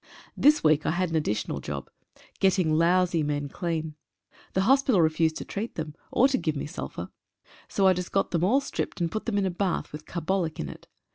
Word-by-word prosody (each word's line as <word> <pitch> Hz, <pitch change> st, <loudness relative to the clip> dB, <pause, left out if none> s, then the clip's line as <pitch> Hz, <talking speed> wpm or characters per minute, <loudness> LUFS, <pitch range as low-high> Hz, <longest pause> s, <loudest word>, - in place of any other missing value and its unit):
This 300 Hz, +2 st, +4 dB
week 155 Hz, -1 st, +4 dB
I -, -, +3 dB
had 180 Hz, -1 st, 0 dB
an -, -, -1 dB
additional 130 Hz, -9 st, -1 dB
job 70 Hz, -2 st, -5 dB, 0.3 s
— -, -, -26 dB
getting 185 Hz, -4 st, +3 dB
lousy 170 Hz, +1 st, +3 dB
men 145 Hz, -1 st, -2 dB
clean. 160 Hz, -1 st, -3 dB, 0.6 s
The 190 Hz, -, +2 dB
hospital 265 Hz, -2 st, +4 dB
refused 160 Hz, 0 st, +2 dB
to -, -, -5 dB
treat 215 Hz, +4 st, -5 dB
them, 155 Hz, -2 st, -4 dB, 0.2 s
or 260 Hz, -, +5 dB
to 265 Hz, -2 st, +1 dB
give 155 Hz, -2 st, -1 dB
me 140 Hz, -, -3 dB
sulphur. 150 Hz, -, -6 dB, 0.6 s
So 195 Hz, -, +1 dB
I 190 Hz, -, +7 dB
just 180 Hz, 0 st, -4 dB
got 195 Hz, -, +1 dB
them 170 Hz, -1 st, +1 dB
all 250 Hz, +10 st, +4 dB
stripped, 270 Hz, -, -4 dB
and 170 Hz, -1 st, 0 dB
put 215 Hz, -, -4 dB
them 215 Hz, -3 st, 0 dB
in 200 Hz, -, +2 dB
a 190 Hz, -, 0 dB
bath 185 Hz, +1 st, -2 dB
with 150 Hz, +1 st, -9 dB
carbolic 170 Hz, -1 st, -2 dB
in 75 Hz, -, -3 dB
it. -, -, -11 dB
170 Hz, 215 wpm, -27 LUFS, 155-195 Hz, 0.6 s, I